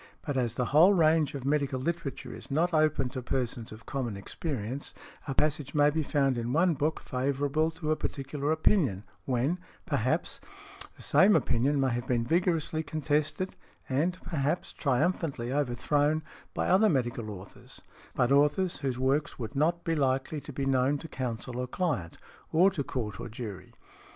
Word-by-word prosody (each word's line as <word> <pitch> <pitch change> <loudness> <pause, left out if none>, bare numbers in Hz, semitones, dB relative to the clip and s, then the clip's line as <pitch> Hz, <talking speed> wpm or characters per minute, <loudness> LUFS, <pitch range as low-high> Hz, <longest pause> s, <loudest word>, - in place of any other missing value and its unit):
But 145 - -3
as 120 -3 0
the 125 - 0
whole 175 +7 +7
range 160 -3 +3
of 135 -2 -5
medical 140 -2 +1
literature 165 0 -3
is - - -11
not 165 +5 +1
open 155 -4 +2
to 130 0 -5
persons 120 -3 -2
of 110 +1 -11
common 120 -7 -3
experience, 130 - -5 0.3
a 135 - -2
passage 150 0 0
may 145 0 +5
be 160 +2 0
found 135 -4 +1
in 120 +2 -2
one 170 +3 +4
book 155 +2 -1
favorable 140 +4 0
to 160 -1 -3
a - - +3
particular 140 +1 -3
opinion, 155 - +2 0.2
when, 135 +7 0 0.3
perhaps, - - -1 0.5
the - - -8
same 200 +2 +5
opinion 140 0 +2
may 135 -1 +2
have 120 +1 -3
been 120 -2 +1
vigorously 165 0 +1
contested, 155 +3 -1 0.3
and, 160 +7 0
perhaps, 155 +1 -1
triumphantly 140 -3 0
overthrown, 145 +3 +1 0.3
by - - 0
other 205 +4 +5
medical 120 -6 -1
authors, 100 -1 -10 0.4
but 125 +1 +2
authors 150 +6 +3
whose 130 -3 -2
works 135 +3 0
would 115 +2 -6
not 170 +4 +1
be 165 - 0
likely 135 +1 0
to 150 - -9
be 135 0 -3
known 135 +1 +2
to 165 - -8
counsel 125 -2 -4
or 125 - -2
client, 125 - -2 0.3
or 180 +5 +5
to 155 -7 -2
Court 110 -7 -4
or - - -6
jury. 105 -5 -7
140 Hz, 165 wpm, -29 LUFS, 125-155 Hz, 0.5 s, whole